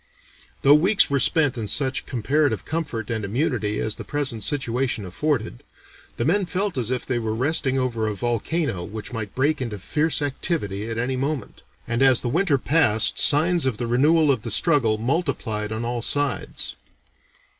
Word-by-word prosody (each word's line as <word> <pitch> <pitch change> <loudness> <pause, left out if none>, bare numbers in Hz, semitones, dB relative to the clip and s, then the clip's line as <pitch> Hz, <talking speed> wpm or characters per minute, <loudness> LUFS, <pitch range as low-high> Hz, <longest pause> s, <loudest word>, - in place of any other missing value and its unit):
Though 140 - +7
weeks 185 +3 +4
were 140 - +2
spent 145 -5 +2
in 110 - -3
such 135 +4 0
comparative 130 0 0
comfort 145 -9 -3
and 110 -1 -2
immunity 110 -2 -1
as 110 - -1
the - - -6
present 140 -6 -2
situation 125 -5 -1
afforded, 110 - -2 0.6
the 120 - -1
men 185 +5 +2
felt 195 +2 -1
as 120 -4 0
if 125 -1 -2
they 125 -2 -1
were 110 -1 -2
resting 135 +1 +1
over 120 -4 -1
a 105 - -2
volcano 120 - -1
which 105 +5 -7
might 110 -4 -5
break 145 +2 +1
into 115 -5 -3
fierce 150 - 0
activity 115 - -2
at 115 - -4
any 125 +2 -1
moment; 140 +1 -3 0.3
and 115 +2 -1
as 130 -2 +5
the 120 - -2
winter 160 +1 +2
passed 120 -7 +3
signs 160 +1 +3
of 120 -5 -1
the 120 - -2
renewal 145 +6 +3
of 130 -5 0
the 115 - -6
struggle 115 - +2
multiplied 110 -5 -2
on 110 +2 -3
all 120 0 -2
sides. 145 +3 -2
130 Hz, 175 wpm, -23 LUFS, 110-150 Hz, 0.6 s, Though